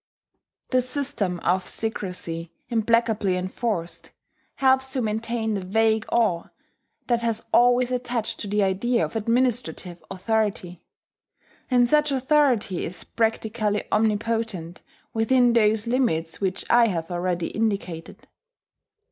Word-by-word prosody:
The 255 -1 +4
system 250 -9 -2
of 185 +1 +1
secrecy, 180 -6 -5 0.2
implacably 225 -4 +2
enforced, 185 -1 -3 0.5
helps 265 0 +2
to 260 - 0
maintain 225 +1 -1
the 200 - -2
vague 220 +3 +1
awe 205 -8 +2 0.6
that 240 -1 +1
has 230 -1 -2
always 245 +1 +4
attached 245 -3 -2
to 210 - -5
the 205 +1 +1
idea 215 +6 +1
of - - -9
administrative 225 -7 -1
authority; 195 -2 -2 0.9
and 245 -2 +4
such 300 +2 +3
authority 265 - +2
is 180 - -6
practically 220 -2 -1
omnipotent 215 -5 0 0.3
within 240 +2 +3
those 215 -1 +3
limits 205 -11 0
which 190 -1 -1
I 235 -1 +5
have 165 -4 -3
already 175 -1 -1
indicated. 200 -7 -3
220 Hz, 115 wpm, -24 LUFS, 185-240 Hz, 0.9 s, I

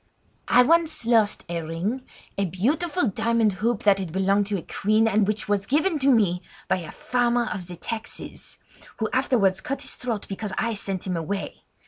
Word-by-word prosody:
"I 250 - +6
once 310 -2 +2
lost 225 -3 +3
a 170 -1 -2
ring—a 195 +5 -4
beautiful 285 - 0
diamond 225 0 +2
hoop 230 -1 0
that 200 -2 +5
had 185 -4 -4
belonged 195 +2 +2
to 205 -1 -1
a 170 - -6
queen, 215 +2 +2
and 215 -2 +3
which 215 +1 -1
was 205 -1 0
given 310 +4 +2
to 275 +1 +3
me 200 -8 +3 0.3
by - - +2
a 170 -4 -7
farmer 245 -1 +1
of 180 -4 -4
the 180 - -7
taxes, 220 +5 -5 0.4
who 220 - 0
afterwards 225 -8 +2
cut 275 +1 -3
his - - -5
throat 230 -4 -4
because 200 0 -4
I 230 0 0
sent 195 -3 -3
him 185 -2 -1
away. 195 +5 -4
215 Hz, 180 wpm, -25 LUFS, 195-245 Hz, 0.4 s, I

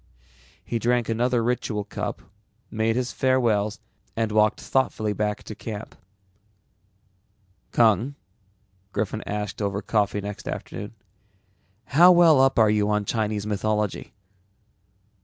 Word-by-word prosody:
He 115 - -2
drank 120 0 +1
another 120 +1 +1
ritual 115 -3 -1
cup, - - -5 0.5
made 110 0 0
his 125 0 -1
farewells 115 -6 +1 0.4
and 115 -1 -1
walked 105 0 +3
thoughtfully 110 -5 0
back 105 0 -2
to - - -8
camp. 105 0 -7 1.8
"Kung," 115 +4 +3 0.8
Griffin 110 +1 -2
asked 105 0 -4
over 100 0 -1
coffee 105 -2 0
next 100 0 -7
afternoon, 105 +2 -6 0.9
"how 175 +6 +6
well 170 -6 +6
up 135 0 +3
are 110 -2 +5
you 105 -1 +1
on 105 -1 0
Chinese 105 -1 -1
mythology?" 105 -1 -2
110 Hz, 115 wpm, -24 LUFS, 105-120 Hz, 1.8 s, how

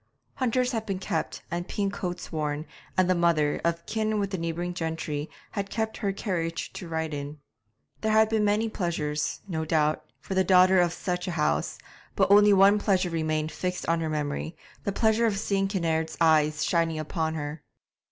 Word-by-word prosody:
Hunters 250 -1 +1
had 225 -3 -3
been 195 -2 -1
kept 185 - -3
and 175 +1 -3
pink 200 -1 -1
coats 180 -2 -5
worn, 150 -1 -2 0.3
and 185 -1 +4
the 185 - +4
mother, 170 -4 +2
of 170 0 -1
kin 215 -1 -1
with 200 -1 -1
the 190 - -1
neighbouring 170 +2 -3
gentry, 160 -3 -3 0.2
had 200 -1 -3
kept 220 +1 -2
her 200 -3 -1
carriage 170 -5 -3
to 180 - -7
ride 160 -1 -2
in. 145 +1 -5 0.6
There 220 - +1
had 220 0 +5
been 220 -1 +1
many 210 +2 +2
pleasures, 165 -8 -2
no 160 -4 -2
doubt, 155 -1 +1 0.2
for - - -6
the 190 0 +3
daughter 185 0 +6
of 175 -1 +2
such 180 +1 -3
a - - -1
house, 75 - 0 0.4
but - - +2
only 205 0 +7
one 200 +1 +6
pleasure 190 -4 +1
remained 155 -1 -1
fixed 180 0 -3
on 165 0 +2
her 160 -1 -2
memory, 150 +2 -3 0.3
the 200 - +1
pleasure 220 +3 +2
of 205 -3 0
seeing 195 0 0
Kinnaird's 165 -4 -1
eyes 155 -1 +3
shining 165 -2 +1
upon 160 +1 -2
her. 145 0 -5
175 Hz, 185 wpm, -27 LUFS, 160-200 Hz, 0.6 s, only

